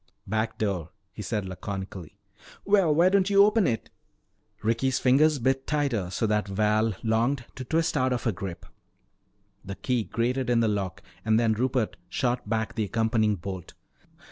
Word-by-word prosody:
"Back 110 +2 -2
door," 95 -7 -2 0.2
he - - -7
said 105 -2 -2
laconically. 95 -1 -7 0.5
"Well, 195 -7 +4
why 175 +4 +5
don't 195 0 +3
you 200 0 +7
open 210 -2 +3
it?" 115 -3 -2 0.7
Ricky's 115 +4 +1
fingers 145 +4 +4
bit 135 +1 0
tighter 135 - 0
so 95 - -1
that 105 -1 +1
Val 105 +2 +1
longed 120 +3 +1
to 130 - -7
twist 160 +6 0
out 130 -2 +2
of 125 - -1
her 115 - +1
grip. 90 -3 -7 1.0
The 95 0 -6
key 125 0 -1
grated 125 +2 -1
in 120 -1 +3
the 115 - +3
lock 100 -4 -2 0.2
and 110 0 +3
then 115 -2 +3
Rupert 125 0 -1
shot 125 -4 -1
back 110 0 -1
the 110 -2 -1
accompanying 110 0 +1
bolt. 95 -1 -7
115 Hz, 165 wpm, -27 LUFS, 105-130 Hz, 1.0 s, you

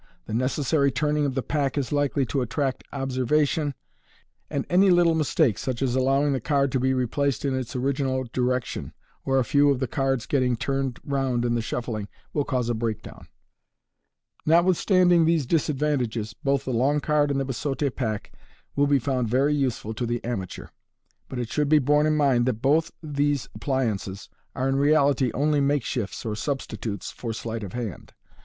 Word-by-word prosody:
The 110 - -6
necessary 140 +4 +1
turning 150 +1 +1
of 130 - -3
the 135 - -1
pack 145 -2 -1
is 140 -3 -1
likely 145 -1 +1
to 135 +2 -1
attract 130 +3 -2
observation, 140 +2 0 0.7
and 140 - -2
any 190 +2 +4
little 175 -2 +5
mistake, 155 - +2
such 130 0 -2
as 125 -2 0
allowing 135 +2 +2
the 130 - -2
card 140 0 +1
to 130 - +1
be 130 +1 +2
replaced 130 +2 0
in 135 - +1
its 130 -2 -4
original 130 0 0
direction, 125 -1 -1 0.3
or 135 0 +2
a 130 - +2
few 145 +4 +4
of 140 - +2
the 130 - 0
cards 135 -2 -1
getting 130 -3 +1
turned 135 0 -2
round 135 -4 0
in 120 0 +1
shuffling, 115 -2 -3 0.3
will 145 - +1
cause 125 -4 -1
a 120 - +1
breakdown. 110 -2 -5 1.2
Notwithstanding 175 +1 +4
these 160 -3 +2
disad 150 +1 +1
vantages, 120 -7 -1
both 140 +2 -1
the 130 - -2
long 135 +5 +2
card 150 0 +2
and 140 -1 0
the 135 - -1
biseaute 135 +1 -2
pack 110 -5 -3 0.4
will 145 0 +3
b* 140 0 +4
found 125 -2 -1
very 135 +5 +2
useful 130 -6 -1
to 120 +2 -3
the 120 0 -2
amateur 105 -6 -4
j - - -17 0.6
but 130 - -6
it 120 -2 -3
should 150 -1 0
be 155 - +6
borne 150 +2 +3
in 155 0 +2
mind 130 -5 +3
that 120 -4 0
both 155 +4 +3
these 145 -3 0
appliances 110 -8 -2 0.3
are 130 +1 0
in 135 0 +1
reality 140 -2 +3
only 150 +2 +2
makeshifts 130 -7 -1
or 110 -1 -2
substitutes 110 -5 -4
for 115 -2 -5
sleight 115 0 -4
of 100 -3 -7
hand. 115 -8 -6
135 Hz, 180 wpm, -25 LUFS, 120-145 Hz, 1.2 s, be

